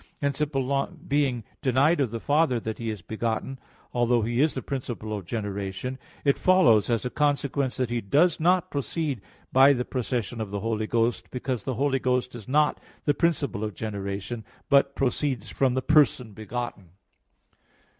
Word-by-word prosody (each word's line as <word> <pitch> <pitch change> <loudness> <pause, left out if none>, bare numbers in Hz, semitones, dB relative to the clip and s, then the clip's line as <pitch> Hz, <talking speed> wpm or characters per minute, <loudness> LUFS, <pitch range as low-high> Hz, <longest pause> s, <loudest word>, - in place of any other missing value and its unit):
Hence, 140 0 -1
it 150 - +1 0.6
being 135 -5 +1 0.2
denied 140 +6 +3
of 130 - +1
the 115 +1 -4
Father 145 -2 +2
that 110 -1 -5
He 115 -1 -3
is 105 -5 -5
begotten, 115 +4 -3 0.3
although 120 -1 +2
He 120 +3 +1
is 155 +1 +2
the 130 - -3
principle 120 -5 -4
of 100 -4 -7
generation, 100 +4 -4 0.3
it 140 - +3
follows, 170 - +5
as 115 0 0
a 125 - -2
consequence, 140 -2 0
that 125 -2 -1
He 120 -1 0
does 150 - +3
not 180 +2 +2
proceed 145 - -2 0.3
by 135 +2 +7
the 125 -2 -2
procession 120 -2 -2
of 110 - -4
the 100 0 -4
Holy 110 -1 -1
Ghost, 115 +1 0
because 125 -3 -3
the 130 - -2
Holy 135 +2 +1
Ghost 125 0 0
is 115 -4 -9
not 150 +2 +2 0.3
the 145 - +4
principle 145 - 0
of 105 -3 -4
generation, 100 +1 -4 0.3
but 140 0 +4
proceeds 130 -3 -1
from 130 -2 +1
the 130 - 0
person 140 -7 +3
begotten. 110 -4 -6
125 Hz, 170 wpm, -26 LUFS, 110-140 Hz, 0.6 s, by